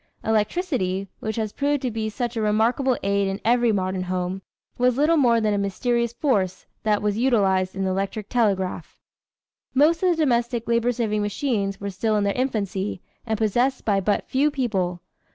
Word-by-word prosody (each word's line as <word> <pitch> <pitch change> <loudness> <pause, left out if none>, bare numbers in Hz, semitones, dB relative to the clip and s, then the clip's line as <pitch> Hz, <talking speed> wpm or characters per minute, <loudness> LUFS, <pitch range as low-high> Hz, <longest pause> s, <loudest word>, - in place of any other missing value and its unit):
Electricity, 215 - 0
which 220 -1 -3
has 215 -2 -2
proved 285 -1 0
to 250 - -1
be 220 0 -2
such 240 +2 -3
a 225 - -1
remarkable 230 +5 +2
aid 200 0 +1
in 195 +1 -3
every 240 0 +3
modern 185 -2 -1
home, 185 +1 -3 0.4
was 250 0 +3
little 305 +4 +4
more 240 -6 +4
than 215 -2 +1
a 205 - 0
mysterious 235 +4 0
force 210 - 0 0.2
that 210 -1 +1
was 210 +1 0
utilized 195 -7 +2
in 195 - -2
the 190 - 0
electric 195 +2 -3
telegraph. 190 -8 -1 0.8
Most 315 +5 +4
of 370 - +3
the 345 - +3
domestic 235 -3 0
labor 235 +1 +2
saving 220 -3 -1
machines 205 -2 -1
were 200 0 -4
still 215 +3 0
in 205 - +2
their 200 0 +1
infancy 210 -7 -2 0.3
and 220 -1 0
possessed 240 +5 +1
by 200 -3 +2
but 205 +2 0
few 280 +3 +2
people. 190 -11 -2
220 Hz, 180 wpm, -24 LUFS, 195-245 Hz, 0.8 s, little